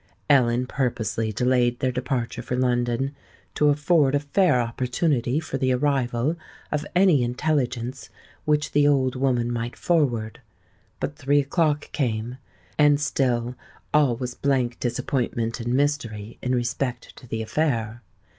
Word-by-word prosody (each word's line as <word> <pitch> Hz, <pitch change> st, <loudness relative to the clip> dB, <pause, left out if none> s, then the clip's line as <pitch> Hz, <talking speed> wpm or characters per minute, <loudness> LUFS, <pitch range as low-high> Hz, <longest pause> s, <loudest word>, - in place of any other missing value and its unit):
Ellen 125 Hz, -2 st, +4 dB
purposely 115 Hz, -4 st, -1 dB
delayed 120 Hz, +2 st, +2 dB
their 130 Hz, -, +1 dB
departure 125 Hz, -1 st, -2 dB
for 125 Hz, +1 st, -3 dB
London, 125 Hz, +2 st, 0 dB, 0.4 s
to 150 Hz, -, +3 dB
afford 145 Hz, -1 st, +3 dB
a -, -, +3 dB
fair 145 Hz, 0 st, +2 dB
opportunity 125 Hz, +3 st, 0 dB
for 155 Hz, -4 st, -4 dB
the 130 Hz, 0 st, +2 dB
arrival 135 Hz, +1 st, 0 dB, 0.3 s
of 150 Hz, 0 st, -2 dB
any 180 Hz, -7 st, +5 dB
intelligence 125 Hz, -1 st, -1 dB, 0.3 s
which 150 Hz, 0 st, +1 dB
the 145 Hz, 0 st, +4 dB
old 135 Hz, -3 st, +2 dB
woman 125 Hz, -2 st, +1 dB
might 120 Hz, 0 st, -3 dB
forward; 125 Hz, -10 st, 0 dB, 0.6 s
but 145 Hz, -, -3 dB
three 145 Hz, 0 st, +2 dB
o'clock 150 Hz, +1 st, 0 dB
came, 120 Hz, -1 st, -2 dB, 0.4 s
and 145 Hz, -1 st, +5 dB
still 125 Hz, -4 st, 0 dB, 0.4 s
all 145 Hz, -5 st, +4 dB
was 125 Hz, 0 st, -4 dB
blank 125 Hz, -3 st, 0 dB
disappointment 120 Hz, -2 st, -2 dB
and 120 Hz, +1 st, -1 dB
mystery 120 Hz, -7 st, -1 dB
in 125 Hz, 0 st, 0 dB
respect 120 Hz, 0 st, -3 dB
to 125 Hz, -, -13 dB
the 110 Hz, -1 st, -3 dB
affair. 120 Hz, -4 st, -1 dB
125 Hz, 135 wpm, -24 LUFS, 120-145 Hz, 0.6 s, any